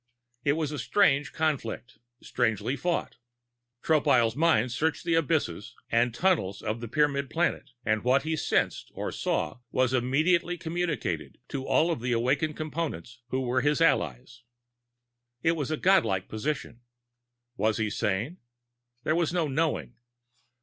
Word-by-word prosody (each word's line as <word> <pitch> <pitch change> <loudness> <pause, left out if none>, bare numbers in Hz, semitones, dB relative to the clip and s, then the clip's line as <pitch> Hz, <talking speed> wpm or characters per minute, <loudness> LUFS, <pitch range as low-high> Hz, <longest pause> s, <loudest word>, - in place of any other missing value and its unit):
It 140 - +3
was 155 -1 -2
a 150 - -4
strange 145 - +3
conflict, 130 -7 -2 0.2
strangely 115 +1 0
fought. 175 +4 -2 0.7
Tropile's 135 -8 +3
mind 140 -7 +3
searched 160 +7 -1
the 170 - +1
abysses 150 - 0 0.2
and 120 +1 +3
tunnels 120 - 0
of 110 +2 -2
the 120 - -5
Pyramid 140 +1 +1
planet, 170 +1 0 0.2
and 110 -1 +1
what 130 +3 +3
he 160 +1 -1
sensed - - 0
or - - -3
saw 75 - -2
was 130 0 +2
immediately 155 +8 +2
communicated 170 -1 -3
to 135 -1 -4
all 165 +2 +3
of 160 - -3
the 125 0 0
awakened 140 +6 0
Components 150 - -4
who 130 +1 -1
were 130 0 +1
his 150 +3 +2
allies. 105 - +1 1.0
It 165 - +4
was 155 -4 -2
a 155 - -1
godlike 165 - +3
position. 120 0 -4 0.7
Was 110 -2 +1
he 110 -2 -1
sane? 110 - -1 0.6
There 155 - +1
was 170 -2 +1
no 170 -3 +1
knowing. 135 - -1
140 Hz, 145 wpm, -28 LUFS, 115-160 Hz, 1.0 s, It